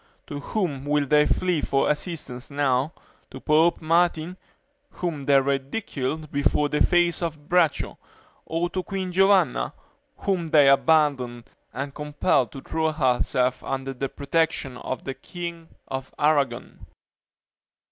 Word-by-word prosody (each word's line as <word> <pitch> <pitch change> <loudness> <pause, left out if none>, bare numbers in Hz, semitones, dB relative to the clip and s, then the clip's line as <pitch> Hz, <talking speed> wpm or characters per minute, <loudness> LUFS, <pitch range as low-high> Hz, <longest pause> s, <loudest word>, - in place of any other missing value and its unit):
To 145 - -6
whom 145 -4 -2
will 145 0 +1
they 150 +1 +4
flee 180 -4 +1
for 135 0 +1
assistance 150 -5 -4
now? 140 0 +1 0.4
to - - -9
Pope 165 +2 +3
Martin, 170 +1 +2 0.5
whom 170 -5 -4
they 140 0 +4
ridiculed 140 +2 -3
before 145 +1 +1
the 150 - -1
face 175 -2 +2
of 155 -3 -4
Braccio; 175 -4 +1 0.5
or 165 +2 0
to 185 - -2
Queen 190 0 -4
Giovanna, 190 - +3 0.4
whom 185 -4 -1
they 150 -3 +5
abandoned, 135 -5 +2 0.2
and 140 +3 -5
compelled 145 -5 0
to 135 - -8
throw 160 +2 -1
herself 125 -3 +1
under 135 0 -3
the 135 +1 -3
protection 145 -2 -1
of 130 0 -5
the 135 - -4
king 170 +1 -7 0.2
of 130 0 -6
Aragon?" 145 -2 0
150 Hz, 130 wpm, -25 LUFS, 135-165 Hz, 0.5 s, they